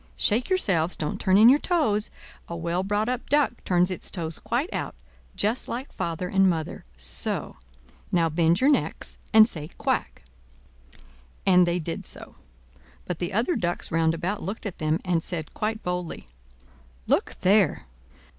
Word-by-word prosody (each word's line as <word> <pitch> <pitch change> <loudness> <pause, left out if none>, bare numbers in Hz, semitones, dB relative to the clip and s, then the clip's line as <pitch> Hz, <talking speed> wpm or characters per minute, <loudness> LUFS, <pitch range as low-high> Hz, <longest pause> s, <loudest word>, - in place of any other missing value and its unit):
Shake 225 +4 +2
yourselves—don't 180 - 0
turn 190 0 +4
in 220 +2 +8
your 270 +4 +7
toes; 225 - +1 0.4
a 170 - -4
well 170 +2 -1
brought 205 +3 0
up 250 0 -3
duck 290 -4 +1
turns 180 0 +2
its 185 - -2
toes 165 -3 -4
quite 275 +9 -2
out, - - -3 0.4
just 215 +5 +1
like 255 +4 -5
father 170 +2 -3
and 195 +1 +3
mother—so! 65 - -1 0.5
Now 170 -2 +3
bend 165 +3 +2
your 275 +3 +5
necks - - -2
and 220 -1 +8
say 155 -8 -5
'Quack!'" - - -2 1.2
And 180 -2 +5
they 175 +1 +1
did 165 -1 -5
so: - - -7 0.7
but 180 -3 -4
the 175 - -2
other 235 - +1
ducks 175 0 -2
round 165 0 +2
about 180 +5 -3
looked 200 +6 -5
at 200 - -5
them, 155 0 +1
and 175 -3 +1
said 160 -2 -5
quite 220 +1 -3
boldly: 180 -1 -4 0.8
"Look - - +1
there! 195 -3 +3
180 Hz, 155 wpm, -25 LUFS, 165-215 Hz, 1.2 s, in